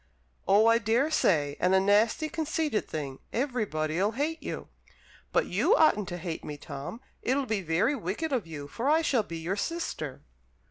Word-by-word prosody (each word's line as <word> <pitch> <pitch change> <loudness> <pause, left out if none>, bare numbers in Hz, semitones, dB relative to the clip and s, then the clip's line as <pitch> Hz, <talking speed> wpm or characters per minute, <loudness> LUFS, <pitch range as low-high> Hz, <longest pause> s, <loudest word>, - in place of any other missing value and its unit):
"Oh, 205 +3 +5
I 230 0 +5
daresay, 220 - +2
and 185 +1 +3
a - - +6
nasty, 210 +10 +3
conceited 315 -5 -1
thing. 140 -4 -5
Everybody'll 205 - 0
hate 310 +6 -2
you." - - -5 0.6
"But - - +2
you - - +3
oughtn't 210 - +4
to 175 - -4
hate 170 -2 -5
me, 150 - -6
Tom. 145 - -7 0.2
It'll 270 +2 +1
be 215 -4 -1
very 175 - +1
wicked 255 - -3
of 235 -10 -1
you, 145 -3 -7
for 235 - -2
I 320 +2 +4
shall 255 -7 +2
be 170 -5 -7
your 170 +4 -2
sister." 200 - -4
210 Hz, 170 wpm, -28 LUFS, 165-275 Hz, 0.6 s, a